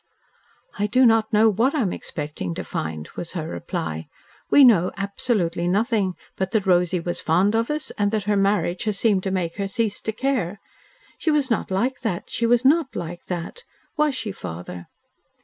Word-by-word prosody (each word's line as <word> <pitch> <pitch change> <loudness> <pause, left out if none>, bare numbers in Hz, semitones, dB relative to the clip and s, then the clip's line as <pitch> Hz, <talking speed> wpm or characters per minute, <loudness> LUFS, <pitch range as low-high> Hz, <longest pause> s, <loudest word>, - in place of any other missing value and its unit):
"I 205 - +2
do 255 +5 +4
not 225 -1 +4
know 220 +1 +5
what 230 +8 +2
I 295 - +2
am 195 -6 0
expecting 145 - -5
to - - -4
find," 80 0 -4
was 170 - -6
her 160 -3 -3
reply. 80 -2 -4 0.4
"We 285 - +7
know 200 -8 +6
absolutely 195 -4 -1
nothing; 200 -1 +1 0.2
but 190 -1 -2
that 215 -3 +1
Rosy 180 -1 +3
was 175 +1 -4
fond 180 +6 +2
of 225 +1 +1
us, 300 0 -3
and 205 0 +3
that 215 -1 -1
her 205 +1 +1
marriage 195 -1 +1
has 210 -2 -1
seemed 205 -4 +2
to - - +1
make 180 -3 -2
her 200 -1 -1
cease 210 +1 -1
to 220 - -2
care. 220 -6 -1 0.6
She 330 - 0
was 290 -4 +2
not 225 - 0
like 240 +8 0
that; 215 -8 -3
she 235 - +1
was 240 +2 +3
not 290 0 +3
like 175 +1 -6
that! 180 - -5 0.3
Was 300 -3 +2
she, 225 -4 -3
father?" 90 - -7
200 Hz, 190 wpm, -23 LUFS, 175-230 Hz, 0.6 s, We